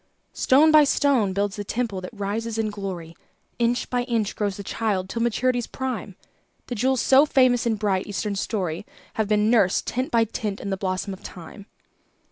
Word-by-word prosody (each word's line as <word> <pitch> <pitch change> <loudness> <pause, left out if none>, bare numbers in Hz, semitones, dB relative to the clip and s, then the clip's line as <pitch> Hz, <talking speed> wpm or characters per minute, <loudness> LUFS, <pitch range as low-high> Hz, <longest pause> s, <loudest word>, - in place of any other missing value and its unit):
Stone 295 +4 +4
by 305 -1 +8
stone 275 -7 +2
builds 200 +1 -1
the 205 - -3
temple 220 -3 -2
that 185 - -6
rises 220 +2 -3
in 220 -1 -1
glory, 185 -5 -6 0.4
Inch 240 +1 +1
by 250 -1 0
inch 225 -5 -1
grows 205 -2 -2
the 200 - -6
child 200 -3 -1
till 230 +4 -4
maturity's 240 +1 0
prime; 255 -7 -5 0.5
The - - -5
jewels 255 +2 +1
so 275 +3 +5
famous 255 -4 +3
in 225 - +1
bright, 200 -3 -1
Eastern 205 0 -3
story 190 -3 -2 0.3
Have 220 -2 -1
been 210 +1 +2
nursed, 200 -6 +3
tint 255 +2 -2
by 230 -1 +3
tint, 215 -2 -4
in 200 - -5
the - - +1
blossom 190 +1 -2
of 190 - -11
Time. 185 +4 -11
215 Hz, 185 wpm, -24 LUFS, 195-245 Hz, 0.5 s, by